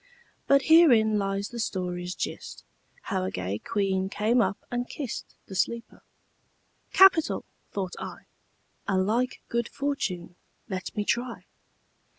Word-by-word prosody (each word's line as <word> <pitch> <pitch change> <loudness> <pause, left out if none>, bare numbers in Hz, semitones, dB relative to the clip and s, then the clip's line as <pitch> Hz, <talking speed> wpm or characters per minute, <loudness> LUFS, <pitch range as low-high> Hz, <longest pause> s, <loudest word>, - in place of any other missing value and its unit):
But 275 0 +5
herein 240 -11 +6
lies 195 0 -1
the 240 - -7
story's 180 -4 -2
gist, - - -5 0.4
How - - -1
a 95 - -1
gay 95 +2 -3
queen 190 -2 0
came 225 +5 +2
up 200 - +1
and 245 0 -2
kist 270 -7 -6
The - - -10
sleeper. 235 +5 -2 0.9
'Capital!' 380 -4 +5 0.3
thought 190 -3 -3
I. - - -7 0.6
'A 195 - +2
like 225 +7 0
good 235 0 -1
fortune 185 -12 -3 0.3
let 190 -4 -5
me 205 - 0
try.' 240 +2 -1
210 Hz, 130 wpm, -27 LUFS, 185-245 Hz, 0.9 s, herein